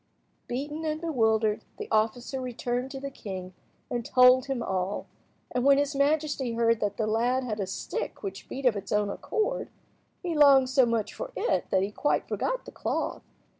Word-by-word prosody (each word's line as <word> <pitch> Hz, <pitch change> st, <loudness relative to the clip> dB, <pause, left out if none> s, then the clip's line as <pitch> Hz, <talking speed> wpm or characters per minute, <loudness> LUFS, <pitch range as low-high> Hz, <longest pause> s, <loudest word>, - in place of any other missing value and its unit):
Beaten 290 Hz, +5 st, -4 dB
and 310 Hz, -1 st, -1 dB
bewildered, 220 Hz, -9 st, +1 dB
the -, -, -5 dB
officer 235 Hz, +4 st, 0 dB
returned 245 Hz, 0 st, -2 dB
to 270 Hz, 0 st, -6 dB
the 275 Hz, 0 st, -5 dB
king 185 Hz, -6 st, -7 dB, 0.3 s
and 240 Hz, -1 st, -2 dB
told 250 Hz, +1 st, +6 dB
him 265 Hz, -4 st, -2 dB
all, 190 Hz, 0 st, -2 dB, 0.5 s
and 250 Hz, -, 0 dB
when 275 Hz, 0 st, +6 dB
his 285 Hz, 0 st, 0 dB
majesty 285 Hz, -3 st, +1 dB
heard 230 Hz, -1 st, +2 dB
that 205 Hz, -1 st, -1 dB
the 220 Hz, -, 0 dB
lad 240 Hz, +4 st, +1 dB
had 220 Hz, -4 st, -3 dB
a 195 Hz, -, -1 dB
stick 190 Hz, -, -4 dB
which 195 Hz, 0 st, -6 dB
beat 270 Hz, 0 st, -5 dB
of 245 Hz, -4 st, +4 dB
its 200 Hz, -1 st, -6 dB
own 210 Hz, -1 st, +1 dB
accord, 440 Hz, -, -2 dB, 0.5 s
he 350 Hz, -2 st, -1 dB
longed 275 Hz, -4 st, +6 dB
so 260 Hz, -2 st, +5 dB
much 230 Hz, -3 st, -1 dB
for -, -, -6 dB
it 475 Hz, -, 0 dB
that 190 Hz, 0 st, +2 dB
he 200 Hz, -, -2 dB
quite 290 Hz, +7 st, 0 dB
forgot -, -, -2 dB
the -, -, -9 dB
cloth. -, -, -2 dB
250 Hz, 185 wpm, -28 LUFS, 215-280 Hz, 0.5 s, told